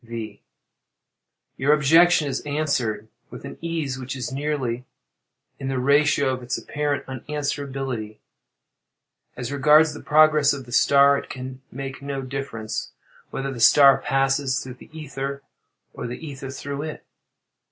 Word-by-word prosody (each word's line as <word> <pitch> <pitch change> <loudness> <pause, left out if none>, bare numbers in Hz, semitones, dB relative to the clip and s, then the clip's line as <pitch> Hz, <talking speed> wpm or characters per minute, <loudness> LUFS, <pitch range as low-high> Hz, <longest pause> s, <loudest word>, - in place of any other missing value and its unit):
V. 115 -3 -7 1.2
Your 140 +3 +3
objection 155 +2 +5
is 135 -1 -2
answered 135 -8 -1 0.2
with - - -10
an - - -9
ease 160 -6 -3
which 130 +1 -5
is 125 -2 -4
nearly 135 -4 -2 0.8
in 135 - -5
the 135 -1 -1
ratio 140 +1 +3
of 130 - -5
its 125 +1 -3
apparent 145 -1 -2
unanswerability.—As 135 -3 -7
regards 150 +2 +5
the 150 - -9
progress 155 -1 +4
of 135 -2 -6
the 120 - -13
star, 140 +2 +5
it - - -11
can 130 0 -7
make 135 +1 -6
no 140 -1 -4
difference 130 -5 -5 0.4
whether 135 0 -4
the 120 - -8
star 140 +4 +7
passes 135 -1 +1
through 130 - -7
the - - -15
ether 140 -3 -6 0.5
or - - -5
the 125 - -5
ether 140 -4 -8
through 140 +1 -5
it. 155 0 -7
135 Hz, 140 wpm, -23 LUFS, 130-145 Hz, 1.2 s, star